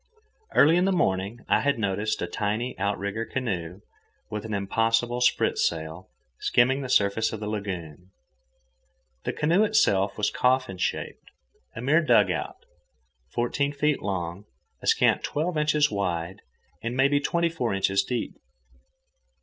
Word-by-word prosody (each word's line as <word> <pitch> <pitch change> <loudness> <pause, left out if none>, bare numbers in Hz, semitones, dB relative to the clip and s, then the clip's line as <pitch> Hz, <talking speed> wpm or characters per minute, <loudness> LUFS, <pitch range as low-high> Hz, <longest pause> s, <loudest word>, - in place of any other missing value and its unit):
Early 160 +4 +6
in 180 - +3
the 195 - +2
morning 100 - 0
I - - +3
had 140 -2 +1
noticed 105 -1 -1
a - - 0
tiny 105 +7 -2
outrigger 100 +2 -2
canoe, 95 -8 -4 0.5
with 105 0 -4
an 110 - -5
impossible 115 +4 0
spritsail, 80 -7 0 0.3
skimming 130 +3 +2
the 130 - -5
surface 105 -1 +2
of 110 - -5
the 105 - -5
lagoon. 90 -5 -5 1.2
The - - -1
canoe 170 +7 +2
itself 100 - +2
was 105 -1 0
coffin 125 -7 +1
shaped, - - -3 0.5
a 110 - -5
mere 150 +7 +3
dugout, 105 - +1 0.7
fourteen 140 +4 -1
feet 150 +1 0
long, 95 -1 -4 0.4
a - - -7
scant - - +3
twelve 160 +4 -2
inches 150 -1 +2
wide, 90 -1 -3 0.4
and 115 +2 -4
maybe 140 +2 +4
twenty 170 +4 0
four 155 -8 -2
inches 95 0 +2
deep. 125 -2 -3
110 Hz, 135 wpm, -26 LUFS, 95-140 Hz, 1.2 s, Early